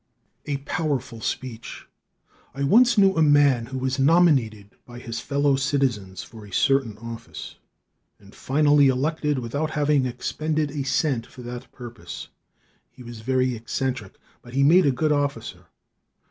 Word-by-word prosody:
A 145 -1 -1
Powerful 140 -5 -3
Speech. 120 0 -5 0.7
I 140 - -3
once 235 - +5
knew 195 -1 +5
a 160 - +2
man 145 -6 +4
who 130 +1 -6
was 130 +1 -2
nominated 135 - +3
by 120 0 -12
his 115 -1 -6
fellow 140 +2 +1
citizens 130 -9 -1
for 110 -2 -13
a 100 - -13
certain 135 -1 +1
office 115 +1 -9 0.6
and 100 0 -18
finally 145 0 +3
elected 150 +2 0
without 140 +6 -2
having 150 -3 +1
expended 155 +4 -2
a 145 -1 -3
cent 135 -3 0
for 125 - -12
that 120 0 -8
purpose. 120 -3 -9 0.6
He 125 - -15
was 120 -2 -9
very 130 +1 +1
eccentric, 120 -1 -4 0.3
but 120 +1 -12
he 140 - +3
made 165 +3 +5
a - - +4
good 155 +4 0
officer. 145 -1 -2
135 Hz, 145 wpm, -24 LUFS, 120-145 Hz, 0.7 s, once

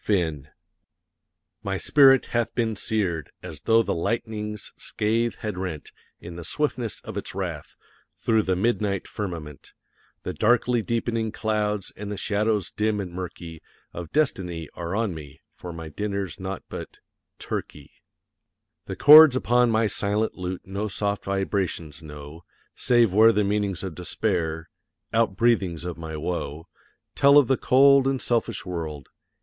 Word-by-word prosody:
FINN 80 -8 -1 1.1
My 95 -1 -2
spirit 135 +3 +5
hath 120 -1 0
been 115 -2 0
seared, 95 -7 -2
as 80 -4 -9
though 115 0 +4
the - - -1
lightning's 105 +2 -3
scathe 115 +2 -1
had 105 -5 -4
rent, 90 -6 -5 0.3
In 85 0 -9
the 85 - -7
swiftness 125 - -2
of - - -8
its - - -5
wrath, - - -5 0.4
through 110 -1 +2
the 95 -3 0
midnight 100 -1 0
firmament, 85 -8 -7 0.5
The - - -4
darkly 120 +1 +2
deepening 115 -1 -1
clouds; 105 -2 -2
and 105 0 -6
the 105 - -4
shadows 105 0 0
dim 105 0 0
and 90 -3 -5
murky 85 -3 -7 0.3
Of 85 -2 -7
destiny 90 - -1
are 85 +2 -4
on 110 -4 0
me, 75 -2 -10
for 90 - -9
my 80 -1 -8
dinner's 100 +1 -4
naught 95 0 -5
but - - -8 0.4
turkey. 70 -2 -6 0.9
The - - -5
chords 150 -1 +9
upon 125 -1 +3
my 115 0 +2
silent 105 +1 0
lute 90 0 -6
no 100 +3 -3
soft 100 +1 -2
vibrations 95 -6 -2
know, 75 +1 -10 0.3
Save 120 -6 +3
where 110 +3 +7
the 105 -2 +1
meanings 100 -3 -1
of 95 -3 -4
despair 85 -3 -2 0.5
out 110 -4 +1
breathings 100 -8 +1
of 85 -2 -5
my 80 -1 -6
woe 80 -1 -4 0.5
Tell 140 +1 +6
of 145 - +7
the 135 - +3
cold 135 +1 +5
and 135 -1 0
selfish 115 -4 -1
world. 80 -6 -5
100 Hz, 145 wpm, -25 LUFS, 85-115 Hz, 1.1 s, chords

